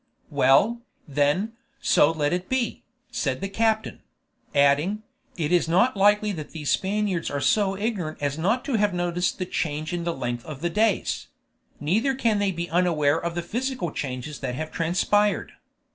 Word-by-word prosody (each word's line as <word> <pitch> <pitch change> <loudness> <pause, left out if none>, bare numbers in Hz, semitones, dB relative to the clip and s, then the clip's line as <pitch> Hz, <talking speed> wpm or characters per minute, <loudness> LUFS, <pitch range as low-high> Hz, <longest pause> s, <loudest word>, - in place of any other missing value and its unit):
"Well, 205 - +4 0.3
then, 145 +10 +1 0.3
so 150 - +4
let 150 -2 0
it 180 +1 -3
be," 260 -2 -1 0.3
said - - -1
the 195 - -3
captain; 220 +2 0 0.6
adding, 145 +9 +3 0.3
"It 160 -2 -1
is 175 -2 +3
not 215 +10 +3
likely 205 +1 +4
that 155 -6 -7
these 150 -3 -2
Spaniards 195 -3 0
are 140 - -2
so 195 +5 +2
ignorant 200 -7 -2
as 145 -1 -1
not 205 +11 0
to 270 -6 0
have 205 -3 +1
noticed 175 0 0
the 185 - -2
change 155 -1 -2
in 175 -1 -2
the 170 0 -2
length 120 -2 -3
of 150 -3 -8
the 175 0 -1
days; 215 +2 +1 0.5
neither 220 - +1
can 230 -5 +1
they 205 -1 +2
be 170 -1 -4
unaware 165 -4 +2
of 170 0 -2
the 175 - -2
physical 245 - -2
changes 135 +2 -5
that 125 -2 -3
have 155 +3 -5
transpired. 195 +5 +1
175 Hz, 170 wpm, -25 LUFS, 150-210 Hz, 0.6 s, Well